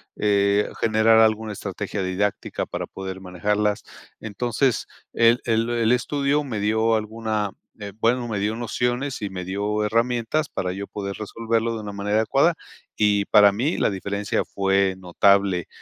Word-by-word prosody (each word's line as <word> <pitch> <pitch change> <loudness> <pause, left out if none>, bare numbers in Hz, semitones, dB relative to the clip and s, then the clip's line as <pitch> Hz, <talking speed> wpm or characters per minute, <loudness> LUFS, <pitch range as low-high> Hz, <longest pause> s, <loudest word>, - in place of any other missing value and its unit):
eh, 100 0 +2
generar 110 0 +4
alguna 110 -1 +2
estrategia 100 0 -4
didáctica 95 +2 -2
para - - -5
poder 95 0 -7
manejarlas. 105 +3 -1 0.4
Entonces, 120 +4 -1 0.3
el 115 +1 +4
el 115 0 +1
el 115 -1 +1
estudio 140 +4 +1
me 115 -7 -4
dio 110 +2 +2
alguna, 110 -1 -2 0.3
eh, 100 -1 -6
bueno, 120 +2 +1
me 105 -2 -2
dio 105 +2 -1
nociones 120 +2 -2
y 100 - -3
me 90 -1 -6
dio 105 +3 -1
herramientas 120 +6 0
para 90 -1 -3
yo 100 +1 -6
poder 100 -1 -5
resolverlo 115 +2 -1
de 110 - -5
una 105 - -6
manera 100 +1 -1
adecuada 135 +9 +3 0.4
y 105 -1 +2
para 105 -1 +6
mí 125 - -1
la - - +2
diferencia 100 +1 -2
fue 95 -1 +1
notable. 95 0 +2
105 Hz, 150 wpm, -23 LUFS, 100-115 Hz, 0.4 s, para